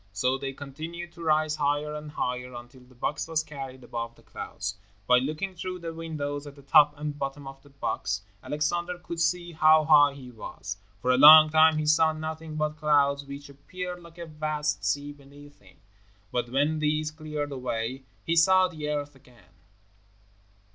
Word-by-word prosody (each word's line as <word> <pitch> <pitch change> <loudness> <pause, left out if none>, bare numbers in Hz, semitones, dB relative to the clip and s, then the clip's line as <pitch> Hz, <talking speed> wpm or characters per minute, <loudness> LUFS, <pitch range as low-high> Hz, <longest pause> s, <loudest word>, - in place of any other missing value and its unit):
So 125 +6 +1
they 135 0 -4
continued 160 +6 -8
to 170 - -13
rise 155 -1 +1
higher 145 +1 0
and 150 0 -7
higher 125 -3 -4
until 120 +2 -11
the 125 0 -20
box 145 +6 -3
was 160 -1 0
carried 135 -4 -8
above 115 0 -5
the - - -22
clouds. 95 +2 -6 0.3
By 125 +2 +5
looking 155 +9 -3
through 185 +1 -5
the 165 -2 -6
windows 150 -3 -5
at 140 - -10
the 140 - -16
top 150 +1 +5
and 150 0 -5
bottom 140 +1 -4
of 135 0 -10
the 145 - -19
box, 135 -6 -3 0.2
Alexander 155 +6 -2
could 170 -1 -7
see 175 +1 0
how 155 -1 +5
high 145 -2 +6
he 130 -3 -11
was. 100 -4 -7 0.3
For 125 - +3
a 125 - +3
long 155 +2 +10
time 160 0 +5
he 155 - -1
saw 160 +1 +4
nothing 155 0 -6
but 155 0 -2
clouds, 140 -2 +2
which 140 +1 -9
appeared 180 +6 -7
like 170 0 -15
a 170 - -6
vast 150 -1 -2
sea 145 0 -1
beneath 145 +1 -16
him, 95 -2 -21 0.5
but 120 -1 -2
when 145 +5 +1
these 155 0 0
cleared 155 -2 -5
away, 125 0 -3 0.2
he 165 - +1
saw 185 +3 +5
the 155 -4 -6
earth 145 -1 -3
again. 120 -9 -22
150 Hz, 180 wpm, -27 LUFS, 135-155 Hz, 0.5 s, long